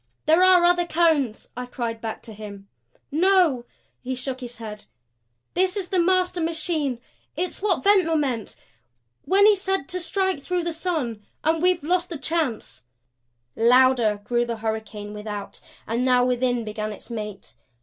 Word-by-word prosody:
"There 320 +3 +5
are 370 -1 +6
other 350 0 +3
Cones," 310 -9 +1
I 250 +1 -5
cried 230 -2 -4
back 225 -1 -5
to 225 - -8
him. 200 -2 -10 0.4
"No," 330 -6 +3 0.4
he 260 +1 -3
shook 255 +1 -4
his 245 -1 -7
head. 210 -2 -8 0.7
"This 370 +2 +1
is 380 -3 -3
the 375 - +1
master 365 0 +2
machine. 315 -5 -1 0.4
It's 355 +4 -3
what 390 -4 +1
Ventnor 380 -5 +4
meant 260 -8 -1 0.7
when 395 +2 +5
he 425 0 +7
said 385 -6 -2
to 365 - -2
strike 380 -3 -1
through 360 +4 -1
the 340 -1 -2
sun. 305 - -3 0.2
And 320 0 +1
we've 360 -3 +2
lost 350 +3 0
the 330 - -4
chance 280 - -3 0.4
" 120 0 -49 0.2
Louder 250 -5 +4
grew 240 +3 +1
the 235 -1 -3
hurricane 220 -1 -4
without; 210 -1 -7 0.2
and 235 +3 -1
now 250 -1 +4
within 245 -1 +1
began 215 0 -4
its 210 - -11
mate. 210 - -6
265 Hz, 160 wpm, -24 LUFS, 225-350 Hz, 0.7 s, he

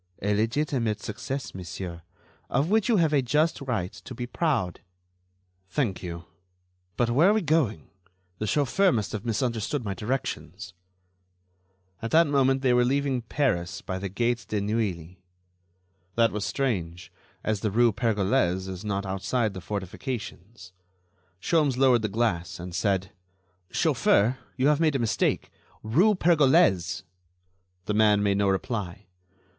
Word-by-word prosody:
"A 105 +1 +2
legitimate 115 0 0
success, 130 +6 -5
monsieur, 90 -1 -7 0.5
of 140 +8 0
which 220 +1 +2
you 225 - +4
have 160 -4 +2
a 140 - +4
just 150 +6 +1
right 95 -9 -2
to 130 - -10
be 120 - -4
proud." 125 - -1 0.9
"Thank 100 -5 -1
you. 85 -1 -6 0.7
But 120 -1 +1
where 155 +10 +5
are - - +5
we 215 -2 +1
going? 145 - +1 0.5
The 110 - -2
chauffeur 150 - +2
must 105 -8 -1
have 110 +1 -5
misunderstood 115 +2 -1
my 100 - -2
directions." 105 - -4 1.3
At 115 - -3
that 165 +5 +5
moment 135 -2 +2
they 125 -2 +4
were 125 0 +4
leaving 135 0 0
Paris 110 - -1
by 95 0 -4
the 100 0 -4
gate 115 +4 -1
de 105 - 0
Neuilly. 95 -5 -2 0.9
That 115 -1 +3
was 105 -1 -3
strange, 90 -11 -2 0.3
as 110 -2 0
the 105 - -1
rue 115 +3 +4
Pergolese 100 -4 +1
is 95 +1 -6
not 100 -1 -2
outside 100 +4 -1
the 95 - -7
fortifications. 100 - -6 0.7
Sholmes 145 - +1
lowered 130 -3 +4
the 110 - -1
glass, 100 -6 -1
and 90 0 -7
said: 95 0 0 0.6
"Chauffeur, 115 +6 +2 0.2
you 130 - +1
have 150 0 +4
made 155 -3 +2
a - - +4
mistake.... 115 -4 0 0.3
Rue 180 - +3
Pergolese!" 155 - +3 0.8
The 105 - -1
man 105 -1 +4
made 100 -1 +2
no 100 -1 +3
reply. 95 -1 -3
115 Hz, 145 wpm, -26 LUFS, 95-135 Hz, 1.3 s, where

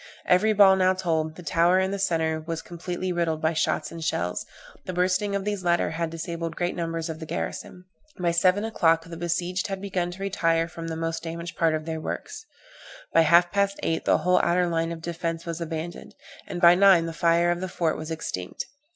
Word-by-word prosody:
Every 185 +5 +4
ball 200 -2 +7
now 185 0 +3
told 160 -4 -1
the 180 - -11
tower 170 +3 +3
in 190 0 +1
the 200 - -3
centre 160 -4 0
was 165 +1 -5
completely 180 +1 -4
riddled 170 -3 0
by 160 +1 +1
shots 155 -1 0
and 165 -1 -7
shells; 90 - -2 0.4
the 185 - -4
bursting 185 +3 +1
of 200 0 -2
these 205 -2 -2
latter 175 -2 +1
had 165 0 -2
disabled 165 0 -5
great 175 0 -1
numbers 165 -1 -3
of 160 -1 -6
the 160 - -7
garrison. 85 - -5 0.3
By 175 -1 +1
seven 185 +5 +3
o'clock 165 -7 +2
the 170 0 -8
besieged 175 +2 -2
had 195 -1 -4
begun 190 -3 -2
to 185 +2 -7
retire 165 -4 +1
from 165 -1 -8
the 165 - -3
most 165 0 -3
damaged 170 0 -6
part 165 -2 +2
of 155 0 -4
their 160 -1 -4
works; 445 - -6 0.7
by 165 - +6
half 170 +2 +5
past 200 0 0
eight 160 0 -1
the - - +4
whole 180 0 +3
outer 180 +1 +2
line 165 -1 -1
of 165 -1 -6
defence 165 -1 -3
was 170 0 -5
abandoned, 165 +1 -6 0.3
and 175 - -5
by 175 0 +8
nine 185 -2 +6
the 165 - -4
fire 170 +1 +3
of 175 +1 -2
the 185 - -3
fort 170 -3 0
was 155 0 -6
extinct. 95 - -5
170 Hz, 210 wpm, -25 LUFS, 165-180 Hz, 0.7 s, by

